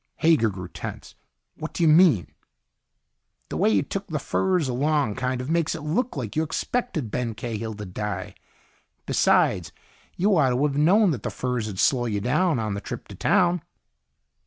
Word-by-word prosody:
Hager 160 -9 +3
grew 90 -2 -7
tense. - - -8 0.4
"What 160 - -6
do 170 - 0
you - - +5
mean?" 155 - +5 1.2
"The - - -4
way - - +3
you 100 -3 +3
took 195 0 -5
the 155 - -2
furs 180 +1 0
along 140 -1 +1
kind 125 +3 -2
of 130 - -6
makes 170 -1 +1
it 155 - -7
look 180 - -1
like 115 -6 -4
you 155 - +2
expected 160 - -2
Ben 115 -2 -2
Cahill 110 -1 -4
to 105 0 -7
die. 105 +3 -5 0.7
Besides, 80 -5 +2 0.5
you 200 +2 +3
ought 140 -4 +4
to 125 +3 +1
have 140 -2 -1
known 180 +7 +4
that 125 -8 -3
the - - -3
furs 125 -3 -2
would 100 -3 -6
slow 120 +3 +2
you 105 -3 -1
down 150 - +1
on 110 -3 -2
the 100 - -4
trip - - -7
to 100 - -9
town." 180 - +2
135 Hz, 180 wpm, -25 LUFS, 110-165 Hz, 1.2 s, you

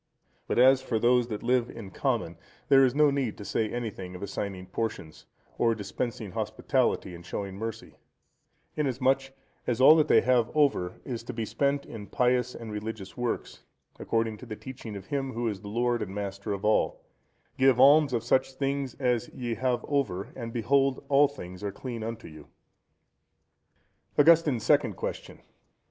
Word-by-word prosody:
But - - -1
as 130 +2 +6
for 125 -3 -1
those 120 +1 +3
that 105 -3 -5
live 125 0 +2
in 105 -5 -9
common, 115 - -1 0.3
there 135 -1 +7
is 130 0 +2
no 150 -1 +5
need 135 -6 -2
to 105 - -9
say 110 +2 -1
anything 105 -6 -5
of 90 - -8
assigning 100 -1 -4
portions, 95 -5 -5 0.3
or 115 -1 +3
dispensing 110 0 -4
hospitality 110 0 -1
and 85 0 -10
showing 95 +2 -5
mercy; 115 +2 -6 0.8
inasmuch 135 -1 +1 0.4
as 120 -1 0
all 135 +4 +9
that 155 -1 +3
they - - +6
have 120 -2 +2
over 140 -12 +1
is 120 -4 -4
to 125 - -5
be 115 -1 -3
spent 140 +4 0
in 105 -3 -9
pious 125 -1 +1
and 115 -2 -8
religious 105 -2 -6
works, 120 -2 -3 0.4
according 115 -1 -1
to 125 - -12
the 110 - -5
teaching 125 -3 -8
of 100 -1 -8
Him 135 0 -3
who 120 0 -2
is 105 -3 -3
the 105 - -9
Lord 120 +3 0
and 95 - -5
Master 100 0 -4
of 100 0 -3
all, 110 - +1 0.6
"Give 130 -2 +5
alms 145 +2 +7
of 120 -2 -1
such 130 +2 +1
things 135 -1 -2
as 125 -2 0
ye 120 -2 -4
have 125 +1 -1
over, 105 -10 -1
and 115 -2 -6
behold 135 +3 +1
all 145 +1 +6
things 90 -10 -10
are 100 - -2
clean 120 +2 -6
unto 115 +1 -5
you."(123) 75 -2 -13 1.8
_Augustine's 155 -8 +5
Second 140 -7 +3
Question. - - -6
120 Hz, 170 wpm, -28 LUFS, 105-130 Hz, 1.8 s, all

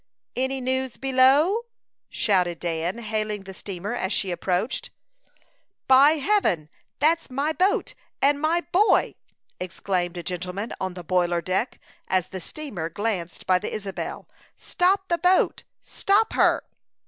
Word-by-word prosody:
"Any 265 +1 -1
news 260 0 -2
below?" 275 - +4 0.4
shouted 180 -5 +1
Dan, 170 +3 -2
hailing 215 -2 -3
the 190 0 -9
steamer 195 +2 -5
as 190 -5 -2
she 190 -3 0
approached. 180 +7 -2 1.0
"By 270 +3 +7
Heaven! 300 - +1 0.3
that's 325 +1 +2
my 280 +4 -1
boat 375 +5 +1 0.3
and 285 +1 +3
my 330 +3 +2
boy!" 410 +5 +3 0.5
exclaimed 180 0 -2
a 175 - -5
gentleman 180 +4 -4
on 185 -1 -3
the 180 - -7
boiler 175 0 +1
deck, 185 +8 -2 0.3
as 185 -2 0
the 190 -1 -6
steamer 200 - -5
glanced 185 -2 -3
by 185 -1 +3
the - - -5
Isabel. 200 -2 -5 0.3
"Stop 385 +2 +1
the 340 -1 0
boat! 365 +1 +2 0.2
Stop 420 +3 +1
her!" - - +3
215 Hz, 135 wpm, -25 LUFS, 180-290 Hz, 1.0 s, By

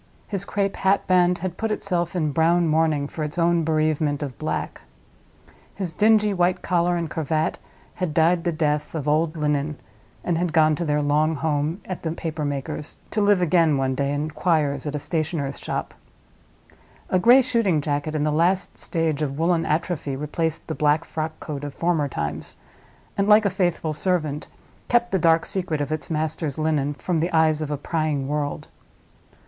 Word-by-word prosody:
His 200 -2 -3
crape 200 -1 -1
hat 195 +1 +2
band 180 -1 +3
had 180 -1 -4
put 225 - -1
itself 180 -4 -1
in 155 -4 0
brown 165 +3 +3
mourning 155 -2 +2
for 155 - -5
its 150 +3 -5
own 170 -1 +3
bereavement 155 -2 0
of 135 -4 -5
black. - - -3 0.9
His 185 -4 -4
dingy 210 -1 +4
white 180 0 +1
collar 175 -1 +1
and 170 -1 -2
cravat 155 +1 -1 0.3
had 180 -4 -2
died 165 +2 +3
the 175 - +1
death 150 -1 -1
of 150 -2 -3
old 155 +2 +1
linen, 150 -1 -1 0.4
and 170 -2 0
had 175 -2 -1
gone 155 -1 +4
to 170 - -2
their 150 -1 +1
long 155 +2 +2
home 155 +4 -1
at 185 - -5
the 160 -1 -2
paper 160 -2 -4
maker's, 145 +1 -4
to 215 - 0
live 205 -3 +4
again 165 -3 +3
one 135 -1 0
day 140 +1 -1
in 150 +2 -2
quires 150 -4 0
at 150 - -3
a - - 0
stationer's 150 -1 -2
shop. - - -4 1.2
A 185 - +3
gray 245 +7 +7
shooting 230 -10 +1
jacket 145 +1 -2
in 150 - 0
the 150 - +1
last 175 +5 +1
stage 160 -4 -1
of 140 -2 -2
woolen 165 0 +1
atrophy 155 -3 -1
replaced 155 +3 -2
the 160 - -4
black 150 +1 +2
frockcoat 155 -2 -5
of 145 -2 -6
former 165 -4 +1
times, 75 - -5 0.6
and, 200 0 +1
like 210 0 +6
a 200 - +2
faithful 175 -4 0
servant, 155 -3 -1 0.4
kept 240 0 +2
the 190 - +2
dark 165 0 +3
secret 175 -5 -2
of 145 +1 -2
its 155 - -3
master's 155 -2 -2
linen 150 -2 0
from 170 +2 -1
the 170 +3 0
eyes 160 -1 +3
of 155 - -3
a 145 - -2
prying 150 -2 -1
world. 145 0 -3
160 Hz, 180 wpm, -23 LUFS, 150-175 Hz, 1.2 s, gray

